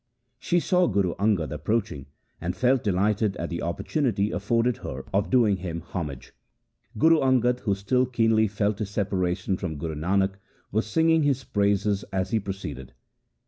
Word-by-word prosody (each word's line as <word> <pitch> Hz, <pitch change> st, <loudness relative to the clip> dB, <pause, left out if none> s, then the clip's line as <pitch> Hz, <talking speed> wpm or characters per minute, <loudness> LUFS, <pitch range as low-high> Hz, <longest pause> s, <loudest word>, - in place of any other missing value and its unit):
She 175 Hz, +6 st, +1 dB
saw 180 Hz, +1 st, +2 dB
Guru 95 Hz, -5 st, +1 dB
Angad 100 Hz, -6 st, +1 dB
approaching 95 Hz, -3 st, -2 dB, 0.3 s
and 90 Hz, +1 st, -2 dB
felt 125 Hz, +6 st, +2 dB
delighted 105 Hz, +1 st, +1 dB
at 85 Hz, -, -4 dB
the 85 Hz, -, -3 dB
opportunity 105 Hz, -, -1 dB
afforded 115 Hz, +5 st, 0 dB
her 65 Hz, +1 st, -7 dB
of 100 Hz, +1 st, +1 dB
doing 115 Hz, -6 st, +3 dB
him 85 Hz, -2 st, -5 dB
homage. 80 Hz, -6 st, -6 dB, 0.6 s
Guru 160 Hz, +6 st, +5 dB
Angad, 125 Hz, -2 st, +2 dB
who 100 Hz, -5 st, 0 dB
still 125 Hz, +6 st, +1 dB
keenly 115 Hz, -3 st, +2 dB
felt 100 Hz, 0 st, -1 dB
his 105 Hz, -3 st, -3 dB
separation 95 Hz, -2 st, -1 dB
from 85 Hz, -6 st, -4 dB
Guru 80 Hz, +2 st, -4 dB
Nanak, 95 Hz, +5 st, 0 dB, 0.3 s
was 110 Hz, +2 st, 0 dB
singing 160 Hz, +7 st, +3 dB
his 140 Hz, -3 st, +1 dB
praises 100 Hz, -1 st, +1 dB
as 95 Hz, +2 st, -2 dB
he 110 Hz, -, +2 dB
proceeded. 75 Hz, -, -7 dB
100 Hz, 155 wpm, -26 LUFS, 90-115 Hz, 0.6 s, Guru